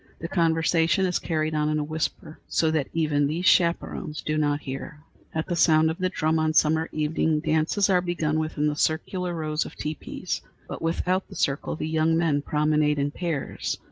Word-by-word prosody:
The 165 - -5
conversation 165 +1 +2
is 180 -1 0
carried 155 -1 -1
on 150 0 +1
in 155 - +1
a 150 - 0
whisper, 155 0 -4
so 160 -1 +1
that 155 -4 0
even 150 -3 +1
these 165 +5 -2
chaperons 170 -3 +1
do 155 - -1
not 145 -1 +1
hear. 135 +2 -6 0.4
At 160 - -1
the 175 - -2
sound 160 -1 +4
of 160 - -7
the 185 0 +1
drum 160 -3 0
on 155 0 +1
summer 160 +1 +3
evenings, 155 0 0
dances 160 +6 +2
are 185 -3 +3
begun 160 -3 -1
within 155 -1 -1
the 150 0 +1
circular 175 +4 -1
rows 155 -1 -1
of - - -10
teepees, 155 +1 -4 0.3
but - - -7
without 180 +3 0
the - - -11
circle 140 0 -1
the 155 - -4
young 160 +1 +2
men 160 -4 +2
promenade 150 0 +1
in 140 0 0
pairs. 160 -4 -3
155 Hz, 190 wpm, -25 LUFS, 150-165 Hz, 0.4 s, sound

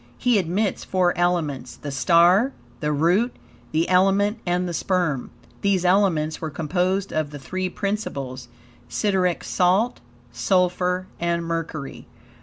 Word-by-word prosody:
He 245 -4 +3
admits 190 +3 -1
four 180 -2 +1
elements 155 -8 -1
the 145 - -7
STAR, 170 - +4 0.3
the 150 - -1
ROOT, 175 - +2 0.4
the 160 +2 +1
ELEMENT 195 +4 +3
and 180 +1 +1
the 175 - -4
SPERM. 170 -6 0 0.3
These 195 -3 +1
elements 180 -5 +2
were 160 - -3
composed 180 +6 -1
of 155 -2 -1
the 145 - -8
three 185 +7 -3
principles, 140 - -4 0.4
SIDERIC 190 -4 0
SALT, 190 +7 +2 0.3
SULPHUR, 180 +7 +1
and 170 0 -1
MERCURY. 165 -4 -5
180 Hz, 125 wpm, -23 LUFS, 155-190 Hz, 0.4 s, STAR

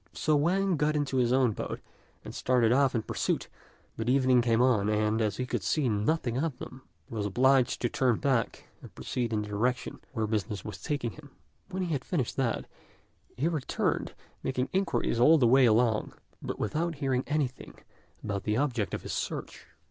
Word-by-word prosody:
So 155 - +1
Wang 180 +4 +2
got 150 +1 +1
into 145 -3 0
his 120 -1 +2
own 130 -2 +3
boat, - - -5 0.5
and - - -7
started 120 -3 +2
off 135 0 +3
in 110 - 0
pursuit; - - -2 0.5
but 115 +1 -2
evening 130 -1 +4
came 115 -1 +2
on, 120 -5 +3
and, 110 +1 +1
as 105 -2 0
he 125 - -2
could - - -2
see 150 -4 +1
nothing 120 +4 0
of 150 -3 -2
them, 130 - -9 0.3
he - - -12
was 105 -2 -1
obliged 130 +4 +3
to - - +3
turn 125 0 +1
back 130 -5 -1
and - - -13
proceed 120 -3 -3
in 105 -1 0
the - - -7
direction 120 +5 -1
where 110 -4 -1
business 105 -1 -3
was 105 - -7
taking 145 -7 -2
him. 145 +2 -14 0.4
When 190 -1 -3
he 170 -3 -2
had 135 -3 -2
finished 140 -10 -2
that, 130 -4 0 0.7
he 145 - +1
returned, 155 -6 -1 0.3
making 130 0 -2
inquiries 190 -10 0
all 155 +7 +7
the 130 - +3
way 130 +2 +6
along, 110 -1 +2 0.3
but - - -4
without 165 +2 -1
hearing 135 -3 0
anything 145 -4 -2 0.5
about 100 -2 -2
the 105 +1 0
object 125 -7 0
of - - -7
his - - -5
search. - - -5
125 Hz, 190 wpm, -29 LUFS, 115-145 Hz, 0.7 s, all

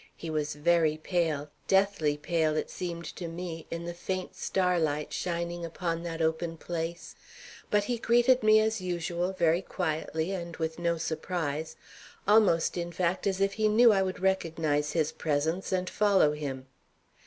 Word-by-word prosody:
He 165 - -5
was 150 -1 -1
very 160 0 +2
pale, 155 -3 -1 0.2
deathly 190 -7 +2
pale, 155 0 0
it - - -2
seemed 170 -2 -5
to 175 - -4
me, 165 -1 -6
in 170 0 -5
the 175 - -4
faint 185 +1 -4
starlight 165 -6 0
shining 170 0 -3
upon 170 0 -3
that 165 -1 -3
open 165 +1 -1
place; 170 0 -5 0.6
but 205 -1 +3
he 235 +2 -2
greeted 240 +2 +4
me 215 0 +6
as 220 -1 0
usual 175 0 -2
very 170 -2 +2
quietly 160 -1 -2
and 170 -3 -5
with 160 0 -3
no 170 -1 +1
surprise, 160 -1 -3 0.5
almost, 205 -6 +4
in 175 0 -3
fact, 180 +3 0
as 190 -1 0
if 195 0 +2
he 215 +1 +1
knew 230 +2 +6
I 195 - +3
would 190 -1 -2
recognize 160 -6 0
his 160 -2 +1
presence 160 +5 -1
and 185 -1 0
follow 200 -8 +3
him. 140 -3 -5
170 Hz, 160 wpm, -29 LUFS, 160-185 Hz, 0.6 s, me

